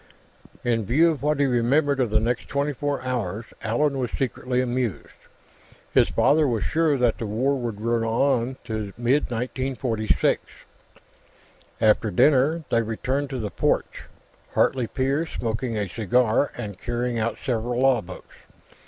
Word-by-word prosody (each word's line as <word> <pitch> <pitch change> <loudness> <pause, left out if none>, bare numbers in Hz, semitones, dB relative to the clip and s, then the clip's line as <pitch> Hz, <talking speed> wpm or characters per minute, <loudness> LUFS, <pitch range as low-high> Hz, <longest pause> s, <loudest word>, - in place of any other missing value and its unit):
In 115 -2 +1
view 155 - +4
of 155 - -5
what 150 0 +1
he 140 - +4
remembered 135 +3 +2
of 125 -3 +1
the 110 +1 +2
next 120 +2 -1
twenty 140 +1 -1
four 145 +1 -2
hours, 115 -4 -3 0.2
Allan 135 +5 0
was 125 -2 -1
secretly 125 -1 -2
amused. 125 -3 -2 0.8
His - - +4
father 150 +1 +3
was 115 -6 0
sure 160 - +2
that 120 -3 +1
the 115 - -3
War 130 +7 +1
would 120 -5 -4
run 115 +1 0
on 125 +2 +1
to 110 -4 -4
mid 125 +5 +1
1946. 125 -2 0 1.4
After 110 0 +3
dinner, 145 - +3
they 115 - +3
returned 130 +5 -2
to 135 - -4
the 105 -4 -4
porch, - - -1 0.5
Hartley 125 -3 +2
père 135 +7 -1
smoking 115 -2 -3
a 105 -1 -1
cigar 115 +6 +1
and 100 -3 -6
carrying 120 0 -2
out 110 +1 -1
several 120 -1 -1
law 130 -3 +4
books. 90 0 -12
125 Hz, 150 wpm, -24 LUFS, 115-135 Hz, 1.4 s, view